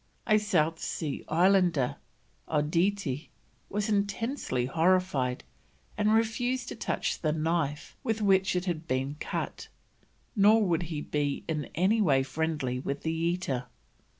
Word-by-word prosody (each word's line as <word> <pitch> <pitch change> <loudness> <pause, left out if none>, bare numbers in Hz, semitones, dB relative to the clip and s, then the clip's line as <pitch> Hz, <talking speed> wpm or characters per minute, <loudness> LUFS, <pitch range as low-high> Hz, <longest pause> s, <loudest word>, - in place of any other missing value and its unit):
A 215 -1 +4
South 165 -6 +1
Sea 150 -4 -3
Islander, 175 -5 +3 0.5
Odidie, 160 0 0 0.4
was 210 +1 -1
intensely 205 - -1
horrified, 160 -4 +1 0.5
and 210 0 +2
refused 230 +3 +1
to - - -5
touch - - -2
the 155 - +1
knife 155 -2 -1
with 220 -1 0
which 190 -3 +3
it 180 0 0
had 165 -3 -3
been 130 +2 -1
cut, - - -4 0.7
nor 215 +1 +5
would 175 -2 +1
he 155 -3 -3
be 145 -2 -1
in 155 -2 -2
any 195 +6 +3
way 135 -8 +4
friendly 135 -3 -2
with 140 +2 -4
the 160 - 0
eater. 165 -6 -1
165 Hz, 130 wpm, -29 LUFS, 150-200 Hz, 0.7 s, nor